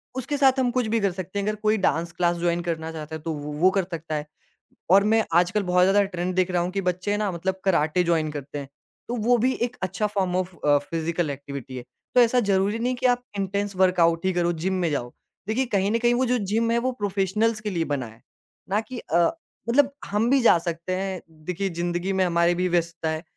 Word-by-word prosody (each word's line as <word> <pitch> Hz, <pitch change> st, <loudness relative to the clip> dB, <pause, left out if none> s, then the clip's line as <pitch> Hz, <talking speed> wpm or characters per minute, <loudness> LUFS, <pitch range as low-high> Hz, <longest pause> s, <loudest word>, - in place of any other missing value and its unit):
उसके 260 Hz, +3 st, -2 dB
साथ 270 Hz, -1 st, +4 dB
हम 255 Hz, -1 st, +2 dB
कुछ 250 Hz, -2 st, 0 dB
भी 230 Hz, -, +3 dB
कर 200 Hz, -2 st, +1 dB
सकते 185 Hz, +2 st, -5 dB
हैं 200 Hz, -, -2 dB
अगर 215 Hz, -, 0 dB
कोई 215 Hz, +1 st, +3 dB
डांस 170 Hz, -3 st, 0 dB
क्लास 175 Hz, 0 st, +1 dB
जॉइन 170 Hz, 0 st, 0 dB
करना 165 Hz, -2 st, -3 dB
चाहता 160 Hz, -1 st, -7 dB
है, 160 Hz, -, -7 dB
तो 165 Hz, 0 st, -3 dB
वो, 150 Hz, 0 st, -6 dB
वो 170 Hz, +5 st, +4 dB
कर 195 Hz, -, +3 dB
सकता 165 Hz, -1 st, -4 dB
है। 150 Hz, 0 st, -3 dB, 0.7 s
और 195 Hz, +1 st, +7 dB
मैं 225 Hz, 0 st, +4 dB
आजकल 180 Hz, +4 st, +3 dB
बहुत 180 Hz, -1 st, +2 dB
ज़्यादा 195 Hz, +2 st, +4 dB
ट्रेंड 180 Hz, -1 st, -3 dB
देख 185 Hz, 0 st, +2 dB
रहा 175 Hz, -1 st, +1 dB
हूँ 180 Hz, -, -3 dB
कि 195 Hz, -, -2 dB
बच्चे 180 Hz, +2 st, -1 dB
ना 210 Hz, -1 st, 0 dB
मतलब 185 Hz, +2 st, -3 dB
कराटे 170 Hz, -1 st, +2 dB
जॉइन 165 Hz, -3 st, +1 dB
करते 145 Hz, 0 st, -6 dB
हैं, 140 Hz, -, -7 dB, 0.4 s
तो 240 Hz, -, -2 dB
वो 240 Hz, +2 st, +3 dB
भी 255 Hz, +3 st, +2 dB
एक 240 Hz, 0 st, -1 dB
अच्छा 190 Hz, +3 st, -1 dB
form 190 Hz, -3 st, -1 dB
of 185 Hz, -1 st, -3 dB
a, 145 Hz, -1 st, +5 dB
physical 165 Hz, +2 st, -2 dB
activity 140 Hz, -2 st, -7 dB
है। 120 Hz, -, -6 dB, 0.3 s
तो 250 Hz, -, +8 dB
ऐसा 240 Hz, +1 st, +4 dB
ज़रूरी 195 Hz, +3 st, +2 dB
नहीं 240 Hz, +2 st, 0 dB
है -, -, -3 dB
कि 255 Hz, -, -3 dB
आप 245 Hz, 0 st, +1 dB
इंटेंस 200 Hz, +1 st, -2 dB
वर्कआउट 175 Hz, -2 st, +3 dB
ही 190 Hz, -, +2 dB
करो, 175 Hz, -1 st, +1 dB
जिम 175 Hz, +4 st, -2 dB
में 170 Hz, -, +2 dB
जाओ, 120 Hz, -4 st, -3 dB, 0.3 s
देखिए 235 Hz, +5 st, 0 dB
कहीं 200 Hz, +1 st, +2 dB
न 230 Hz, -, +2 dB
कहीं 240 Hz, 0 st, +3 dB
वो 255 Hz, +2 st, +2 dB
जो 250 Hz, 0 st, +1 dB, 0.2 s
जिम 230 Hz, +1 st, +2 dB
है, 235 Hz, -, +2 dB
वो 255 Hz, +2 st, 0 dB
प्रोफेशनल्स 205 Hz, +3 st, 0 dB
के 215 Hz, -, -3 dB
लिए 170 Hz, -3 st, -1 dB
बना 130 Hz, -4 st, -2 dB
है, 110 Hz, +1 st, -16 dB, 0.5 s
ना 205 Hz, +2 st, +1 dB
कि 245 Hz, +2 st, -8 dB
अ, 165 Hz, -, -1 dB, 0.5 s
मतलब 275 Hz, +3 st, +4 dB
हम 210 Hz, +3 st, 0 dB
भी 270 Hz, 0 st, +4 dB
जा 230 Hz, -, +6 dB
सकते 170 Hz, +2 st, -2 dB
हैं, 190 Hz, -1 st, -3 dB
देखिए, 175 Hz, +5 st, -4 dB
ज़िंदगी 175 Hz, +2 st, -2 dB
में 190 Hz, -, +2 dB
हमारी 170 Hz, 0 st, +2 dB
भी 180 Hz, +1 st, 0 dB
व्यस्तता 165 Hz, -1 st, -2 dB
है, 160 Hz, +1 st, -3 dB
185 Hz, 240 wpm, -24 LUFS, 170-215 Hz, 0.7 s, तो